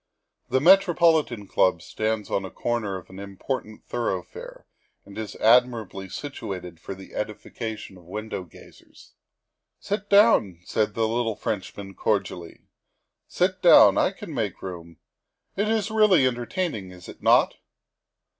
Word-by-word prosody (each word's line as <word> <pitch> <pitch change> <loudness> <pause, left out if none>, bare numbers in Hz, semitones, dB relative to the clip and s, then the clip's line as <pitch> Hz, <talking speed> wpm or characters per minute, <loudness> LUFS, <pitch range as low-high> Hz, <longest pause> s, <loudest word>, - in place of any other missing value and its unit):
The 130 - +2
Metropolitan 165 - +4
Club 90 -4 +2
stands 110 -1 -3
on 100 - 0
a 95 - -6
corner 110 -2 -2
of 95 - -13
an 95 - -10
important 105 +3 -6
thoroughfare 95 -7 -5 0.4
and 100 - -13
is 110 -1 -6
admirably 115 -5 +2
situated 90 - -7
for 95 - -7
the 95 0 -13
edification 105 -1 -6
of 90 - -18
window 105 +1 -5
gazers. 85 - -18 0.3
" - - -58 0.3
Sit 205 0 -4
down," 200 - +4
said 105 -1 -1
the 115 -1 +1
little 115 -1 -1
Frenchman 100 -1 -5
cordially, 95 -5 -2 0.4
" - - -50 0.3
sit - - 0
down. - - +8
I - - +3
can - - -9
make - - -3
room. 85 -3 -8 0.6
It 205 +2 0
is 220 -1 0
really 210 -10 +5
entertaining, 120 - -2
is 90 -1 -13
it - - -12
not?" - - +4
110 Hz, 140 wpm, -25 LUFS, 95-130 Hz, 0.6 s, down